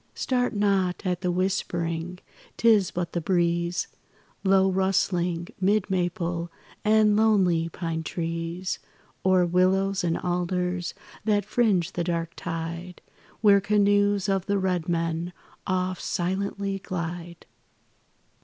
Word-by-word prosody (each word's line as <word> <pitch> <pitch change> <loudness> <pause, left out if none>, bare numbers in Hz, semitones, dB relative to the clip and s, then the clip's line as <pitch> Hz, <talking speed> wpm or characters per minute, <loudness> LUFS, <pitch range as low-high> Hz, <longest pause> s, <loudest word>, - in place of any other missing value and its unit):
Start 245 -3 0
not 195 -2 +1
at 180 -1 -1
the 180 - 0
whispering, 175 -2 -1 0.4
'tis 215 -5 +4
but 175 -1 -4
the 175 - -1
breeze, 170 0 0 0.6
Low 190 -1 +4
rustling, 185 -2 0
'mid 195 +1 +1
maple 175 -2 -1 0.3
and 215 -1 +4
lonely 190 -7 +3
pine 165 -1 -3
trees, 165 +2 -3 0.4
Or 185 -1 +4
willows 190 +2 +2
and 165 -1 +1
alders 180 0 -1 0.3
that 205 -3 +2
fringe 200 -6 +2
the 175 - -2
dark 170 -1 -2
tide 170 +1 -5 0.4
Where 200 -2 +6
canoes 205 -1 +3
of 195 -2 0
the 200 0 +2
red 180 -3 -1
men 165 +1 -1 0.3
oft 185 -1 -1
silently 195 +2 -2
glide. 170 -1 -5
180 Hz, 115 wpm, -26 LUFS, 170-195 Hz, 0.6 s, Where